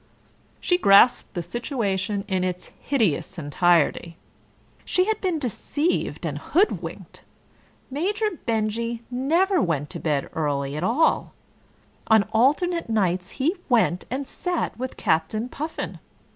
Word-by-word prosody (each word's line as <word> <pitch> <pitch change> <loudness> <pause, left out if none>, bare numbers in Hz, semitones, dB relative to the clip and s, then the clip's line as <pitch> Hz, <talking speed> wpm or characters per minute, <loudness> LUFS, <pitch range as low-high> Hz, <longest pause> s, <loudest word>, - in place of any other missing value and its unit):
She 355 0 +1
grasped 200 - +5
the 175 - -2
situation 200 - -2
in 190 -2 0
its 180 -1 -3
hideous 195 - 0
entirety. 170 +1 +1 0.7
She 365 - +1
had 440 +1 -1
been 365 -4 0
deceived 290 - -1
and - - -3
hoodwinked. 390 +6 -1 0.7
Major 415 +9 0 0.2
Benjy 230 +1 -1
never 335 +10 +2
went 150 -4 -1
to - - -6
bed 150 -4 -1
early 140 -3 -1
at 155 - -3
all: 245 - +2 0.7
on 220 -2 +5
alternate 300 +8 +2
nights 185 -4 0
he 300 +7 +1
went 220 -7 +2
and 270 +3 -3
sat 360 -2 -2
with 255 +1 -5
Captain 160 +9 0
Puffin. 310 +5 -5
225 Hz, 120 wpm, -24 LUFS, -, 0.7 s, grasped